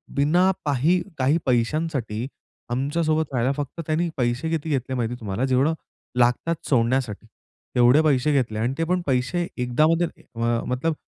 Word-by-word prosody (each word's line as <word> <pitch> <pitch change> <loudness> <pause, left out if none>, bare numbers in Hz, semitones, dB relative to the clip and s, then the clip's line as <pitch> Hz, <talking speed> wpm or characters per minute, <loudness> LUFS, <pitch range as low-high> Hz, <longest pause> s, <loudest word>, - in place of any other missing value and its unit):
बिना 175 +7 +3
पाही 150 +6 +2 0.2
काही 135 +5 +3
पैशांसाठी 125 -2 -1 0.4
आमच्यासोबत 155 +5 0
राहायला, 125 +2 +1
फक्त 145 +3 -5
त्यांनी 165 +2 0
पैसे 125 +5 0
किती 160 -1 -2
घेतले 130 -2 -1
माहिती 120 0 -1
तुम्हाला? 110 +3 -2
जेवढं 135 +5 +2 0.5
लागतात 125 +8 +2
सोडण्यासाठी. 120 -4 +1 0.5
तेवढे 125 +5 +6
पैसे 150 -1 +2
घेतले 115 -6 0
आणि 120 +4 0
ते - - +2
पण 180 +2 0
पैसे 135 +7 0
एकदा. 125 +4 +1 0.5
अ, 115 0 0
मतलब 135 +6 0
135 Hz, 140 wpm, -24 LUFS, 120-155 Hz, 0.5 s, तेवढे